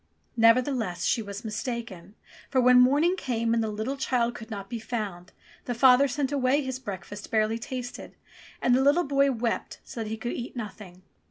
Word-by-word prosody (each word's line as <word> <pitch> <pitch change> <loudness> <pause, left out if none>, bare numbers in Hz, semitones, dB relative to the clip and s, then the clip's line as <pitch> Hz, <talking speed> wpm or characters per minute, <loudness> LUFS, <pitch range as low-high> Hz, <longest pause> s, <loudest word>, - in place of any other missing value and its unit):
Neverthe 240 +4 +4
less, 180 -8 -3
she 230 - +2
was 200 +2 -7
mistaken, 220 -3 -5 0.3
for 265 - +2
when 250 0 +6
morning 290 +8 +4
came 230 -8 -1
and 230 - +2
the 220 - -1
little 220 +6 -3
child 240 -3 0
could 225 -1 -10
not 200 -3 -6
be 235 +1 -5
found, 205 -6 -5 0.3
the 245 - -3
father 260 +3 +6
sent 275 +1 -2
away 280 +1 +2
his 260 -1 -4
breakfast 205 -3 -7
barely 220 +1 +1
tasted, 245 +1 -7 0.5
and 245 - +4
the 255 - +4
little 290 +6 +4
boy 275 -2 +2
wept 235 -2 -3
so 230 - -7
that 215 - -6
he 220 - -3
could 240 +2 -4
eat 240 - -6
nothing. 200 -5 -8
235 Hz, 190 wpm, -27 LUFS, 220-260 Hz, 0.5 s, when